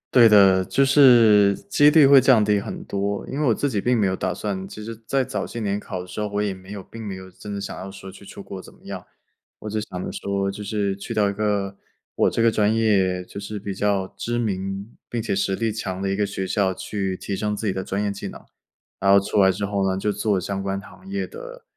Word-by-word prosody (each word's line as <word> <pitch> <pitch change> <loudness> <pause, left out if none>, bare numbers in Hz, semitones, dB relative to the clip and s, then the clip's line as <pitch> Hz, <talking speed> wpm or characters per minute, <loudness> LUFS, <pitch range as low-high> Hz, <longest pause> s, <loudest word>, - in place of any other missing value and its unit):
对 120 -2 +8
的， 95 -3 +6
就 135 - +2
是 115 -8 +6
几 145 +6 +6
率 150 -1 +6
会 135 0 +8
降 125 -4 +5
低 105 -1 +2
很 - - -6
多， 100 0 -3
因 135 - -4
为 150 - +1
我 115 - +3
自 145 - 0
己 110 -6 -1
并 125 +4 +1
没 105 - +2
有 95 - 0
打 95 -1 -2
算 95 0 -4
其 105 - -9
实 115 +2 -6
在 135 +2 +1
早 - - -4
些 115 - -6
年 100 -1 -1
考 95 -3 -6
的 - - -9
时 90 - -7
候， 105 - -1
我 105 0 -2
也 100 -2 -1
没 95 0 -14
有 100 -2 -7
并 115 - -11
没 100 - -4
有 95 0 -11
真 105 +3 -9
的 100 - -4
想 - - -6
要 95 - -7
说 95 0 -10
去 100 - -14
出 100 - -10
国 95 -1 -8
怎 - - -15
么 - - -23
样， - - -7 0.5
我 105 - -6
只 110 +1 -2
想 90 -4 -6
着 - - -4
说 100 0 -2
就 105 +1 -8
是 100 -1 -1
去 110 +4 -6
到 105 -2 +2
一 - - -3
个 100 -1 -1 0.4
我 - - +3
这 - - -1
个 115 0 +4
专 105 0 +2
业 95 -5 +2
就 95 - -9
是 105 +1 -6
比 100 0 -5
较 100 0 0
知 120 0 -2
名 100 -1 -3 0.2
并 120 - -2
且 115 - -1
实 95 0 0
力 115 +2 -1
强 95 -3 -4
的 100 - -1
一 95 - -1
个 105 - +1
学 95 -1 -4
校， 95 0 +1
去 95 0 -3
提 100 - -6
升 105 0 -1
自 110 - -5
己 100 - +1
的 95 - -3
专 100 +2 -2
业 105 - 0
技 100 - -6
能， - - -10 0.6
然 100 - +1
后 100 - +8
出 100 +1 0
来 95 - +6
之 95 +2 -1
后 100 -1 0
呢 95 - -1
就 105 +2 0
做 105 0 0
相 95 +2 -3
关 95 0 -2
行 185 - -15
业 200 0 -2
的， - - -10
100 Hz, 290 characters per minute, -23 LUFS, 95-110 Hz, 0.6 s, 对